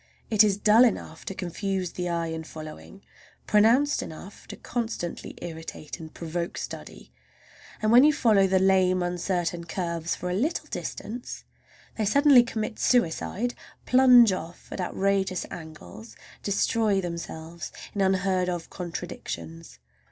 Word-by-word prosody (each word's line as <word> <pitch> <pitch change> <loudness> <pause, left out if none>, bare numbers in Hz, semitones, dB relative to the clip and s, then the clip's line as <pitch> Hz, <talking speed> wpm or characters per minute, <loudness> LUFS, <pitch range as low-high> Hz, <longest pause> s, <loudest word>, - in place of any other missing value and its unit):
It 215 -1 +6
is 200 -2 +2
dull 215 +3 +6
enough 195 -9 -1
to 195 - -5
confuse 190 0 -3
the 180 -1 -3
eye 170 -1 -1
in 160 0 -4
following, 155 +5 -10 0.4
pronounced 235 +8 +4
enough 180 +5 -10
to - - -7
constantly 225 -8 -4
irritate, 160 0 -7
and 160 -1 -9
provoke 170 +1 -4
study, - - -8 0.7
and 215 - +3
when 245 +3 +8
you 305 - +7
follow 215 -9 +3
the 190 0 +3
lame, 185 -1 +3
uncertain 175 -1 -2
curves 170 -1 -3
for 180 - -4
a - - -1
little 260 - -1
distance 240 +3 -6 0.6
they 215 - +1
suddenly 280 +3 +6
commit 220 -2 -4
suicide—plunge 245 +3 +3
off 170 -1 -7
at - - -4
outrageous 190 0 0
angles, 160 +7 -10 0.3
destroy 205 0 +1
themselves 170 -1 -6 0.2
in 205 - -2
unheard 190 -1 +1
of 175 -2 -4
contradictions. 85 - -7
190 Hz, 130 wpm, -26 LUFS, 170-215 Hz, 0.7 s, when